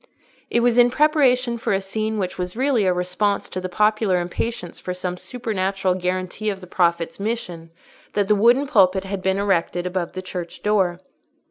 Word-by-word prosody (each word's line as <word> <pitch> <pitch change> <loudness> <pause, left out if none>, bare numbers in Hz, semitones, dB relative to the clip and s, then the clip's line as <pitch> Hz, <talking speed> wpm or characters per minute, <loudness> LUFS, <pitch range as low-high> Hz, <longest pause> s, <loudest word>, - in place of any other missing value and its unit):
It 235 - +2
was 240 0 +3
in 245 0 +7
preparation 255 -4 +2
for 225 - 0
a 195 - +2
scene 215 +3 -3
which 185 -3 -3
was 180 +3 -4
really 260 -5 +2
a - - +4
response 180 +3 0
to 185 - -4
the 185 - -4
popular 210 0 +2
impatience 180 +2 -4
for 180 - -5
some 180 0 -3
supernatural 195 -2 -2
guarantee 185 +3 -2
of 195 -2 -3
the 185 - -11
Prophet's 170 -2 0
mission, 190 -6 -4 0.4
that 205 -1 +1
the 210 - +4
wooden 240 +7 +4
pulpit 195 -8 +3
had 195 0 -4
been 190 0 +1
erected 180 -3 0
above 180 -1 -3
the 185 - -5
church 180 -2 -7
door. 195 -4 +2
195 Hz, 180 wpm, -22 LUFS, 180-220 Hz, 0.4 s, in